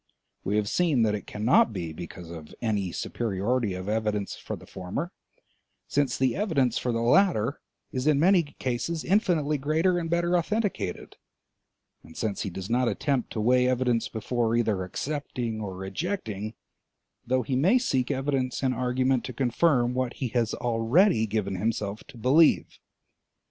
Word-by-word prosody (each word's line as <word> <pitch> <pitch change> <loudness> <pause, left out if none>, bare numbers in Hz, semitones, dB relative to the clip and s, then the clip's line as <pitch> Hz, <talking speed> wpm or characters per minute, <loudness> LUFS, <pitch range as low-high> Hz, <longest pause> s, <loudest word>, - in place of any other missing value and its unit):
We 100 - -1
have 105 -1 +1
seen 155 -4 +2
that 105 -2 +2
it 105 - -5
cannot 110 +2 +3
be 85 -5 -4
because 85 0 -9
of 80 -3 -10
any 105 -6 -1
superiority 110 +1 -1
of 95 +1 -6
evidence 105 -2 -1
for - - -6
the - - -13
former, 95 - -5 0.8
since 140 -3 +1
the 130 -2 +1
evidence 150 - +1
for 125 - -1
the 115 0 -1
latter 135 - +3 0.3
is 130 +2 -2
in 150 -2 +4
many 180 +3 +5
cases 145 +2 -3
infinitely 165 -7 +2
greater 160 +6 +2
and 165 -1 -4
better 170 +1 +1
authenticated, 200 - -2 0.8
and 80 - -15
since 105 -4 -2
he - - -2
does 95 +1 -6
not 125 +2 +2
attempt 135 0 -1
to 110 - -2
weigh 125 +3 +4
evidence 125 -2 +1
before 115 +1 -1
either 110 -5 +1
accepting 120 +1 -4
or 95 -3 -5
rejecting, 110 - -4 0.7
though 130 +1 +2
he 130 +4 -2
may 175 - +4
seek 130 - 0
evidence 135 -2 -1
and 130 -1 +2
argument 125 +1 +1
to 130 - -6
confirm 125 0 +2
what 130 -1 -1
he 130 - -3
has 115 -1 0
already 120 - +3
given 100 -2 -2
himself 105 0 -2
to 135 - -14
believe. 140 +8 +3
125 Hz, 160 wpm, -27 LUFS, 110-145 Hz, 0.8 s, many